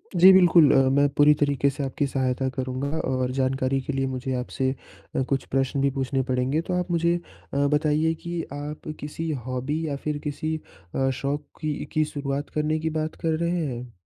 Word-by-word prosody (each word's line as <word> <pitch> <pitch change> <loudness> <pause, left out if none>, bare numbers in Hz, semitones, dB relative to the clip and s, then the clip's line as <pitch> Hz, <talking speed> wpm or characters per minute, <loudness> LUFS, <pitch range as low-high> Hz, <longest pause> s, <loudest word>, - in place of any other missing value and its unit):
जी, 185 +2 +9
बिल्कुल 175 -5 +7
अ, - - +5
मैं 140 +1 +4
पूरी 145 +1 +7
तरीके 140 -1 +3
से 140 +1 -4
आपकी 140 +2 -1
सहायता 130 0 0
करूँगा 130 +1 -2 0.2
और 130 -1 0
जानकारी 135 0 0
के 140 - -4
लिए 135 0 0
मुझे 130 0 -3
आपसे 130 +1 -1 0.5
अ, - - +2
कुछ 135 -1 0
प्रश्न 135 +1 +1
भी 140 - +3
पूछने 135 0 -1
पड़ेंगे। 130 +5 +1
तो 180 +2 -4
आप 180 0 -3
मुझे 170 0 +2 0.4
अ, - - -1
बताइए 155 +2 +2
कि 170 0 -3
आप 150 +1 -6
किसी 160 +2 -4 0.2
हॉबी 130 +5 -2
या 140 - -2
फिर 150 -1 -1
किसी 155 +2 -2 0.4
अ, 135 0 +2
शौक़ 140 +2 -1 0.2
की 155 -1 0 0.2
की 155 - +3
शुरुआत 140 -1 -3
करने 155 +1 +1
की 160 - -1
बात 155 0 -3
कर 160 -1 +1
रहे 170 -1 0
हैं? 120 0 -8
145 Hz, 190 wpm, -25 LUFS, 135-155 Hz, 0.5 s, जी